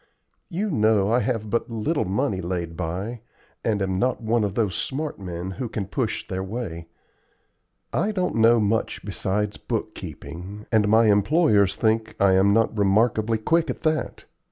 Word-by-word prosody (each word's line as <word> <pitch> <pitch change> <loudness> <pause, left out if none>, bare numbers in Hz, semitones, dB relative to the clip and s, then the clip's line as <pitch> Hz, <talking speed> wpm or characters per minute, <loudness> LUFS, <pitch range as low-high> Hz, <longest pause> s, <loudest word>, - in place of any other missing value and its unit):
You 200 +3 -2
know 110 -4 +3
I 120 - +4
have 115 -4 -1
but 115 - 0
little 120 +8 -1
money 100 +1 -1
laid 85 -2 -3
by, 95 +8 -4 0.4
and 105 -3 0
am 95 -1 -1
not 125 +3 +1
one 115 -1 +1
of 100 -1 -2
those 105 -5 +1
smart 145 - -3
men 90 -1 -5
who 120 +5 -5
can 105 -2 -3
push 115 +4 -2
their 95 -2 -3
way. 95 -5 -5 1.1
I 210 - +1
don't 185 -3 -1
know 115 +1 +5
much 110 +1 -1
besides 105 +2 -2
bookkeeping, 90 +8 -6
and 110 -2 +3
my 110 +2 +5
employers 105 - +3
think 110 0 0
I 100 -1 +5
am 95 +2 +4
not 115 +1 +2
remarkably 110 +2 +2
quick 165 +8 +1
at 125 - -4
that. 155 -1 -1
110 Hz, 160 wpm, -24 LUFS, 95-120 Hz, 1.1 s, know